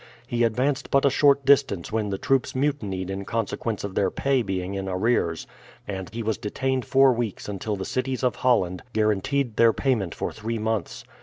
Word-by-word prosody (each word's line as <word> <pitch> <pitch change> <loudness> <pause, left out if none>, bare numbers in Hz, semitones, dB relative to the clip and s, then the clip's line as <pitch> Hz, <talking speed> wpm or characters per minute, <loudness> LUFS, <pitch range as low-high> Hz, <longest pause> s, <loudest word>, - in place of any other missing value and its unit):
He 120 0 0
advanced 125 +5 0
but 140 0 +3
a 140 - +4
short 140 0 +4
distance 130 -10 +3
when 110 -1 -1
the 95 - -2
troops 135 0 0
mutinied 105 -10 -1
in 95 0 -4
consequence 115 0 -3
of 100 -2 -4
their 95 -1 +2
pay 135 -2 +1
being 95 -3 -3
in 95 -1 -3
arrears, 90 -4 0 0.4
and 95 -2 -5
he 115 +2 -4
was 110 -1 -1
detained 130 +4 -2
four 135 +1 +5
weeks 115 -4 -3
until 105 +1 -3
the 95 -1 -5
cities 130 0 -2
of 125 - +1
Holland 95 -8 +1
guaranteed 110 +4 0
their 115 -1 +6
payment 115 -10 0
for - - -3
three 115 +1 -4
months. 110 -4 -2
110 Hz, 185 wpm, -25 LUFS, 100-130 Hz, 0.4 s, their